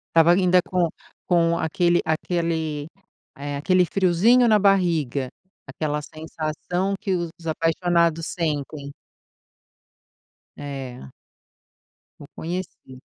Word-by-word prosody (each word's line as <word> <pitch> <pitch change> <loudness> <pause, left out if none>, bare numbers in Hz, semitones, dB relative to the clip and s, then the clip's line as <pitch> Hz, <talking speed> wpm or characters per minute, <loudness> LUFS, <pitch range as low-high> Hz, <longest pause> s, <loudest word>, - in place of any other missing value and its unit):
Estava 165 +1 +6
ainda 180 0 +4
com 180 -3 +1 0.4
com 170 -1 +3
aquele 175 +2 +2
aquele, 160 -2 -1 0.5
eh, 145 +1 -4
aquele 180 +5 +3
friozinho 195 +8 +4
na 215 -2 +5
barriga. 170 -10 +2 0.4
Aquela 150 +2 -3
sensação 160 +5 -3
que 195 -3 -1
os 170 -1 -4
apaixonados 165 0 +1
sentem. 150 -3 -3 1.6
É. 135 - -7 1.1
O 145 - -11
conhecido. 165 -6 -6
165 Hz, 90 wpm, -23 LUFS, 150-180 Hz, 1.6 s, Estava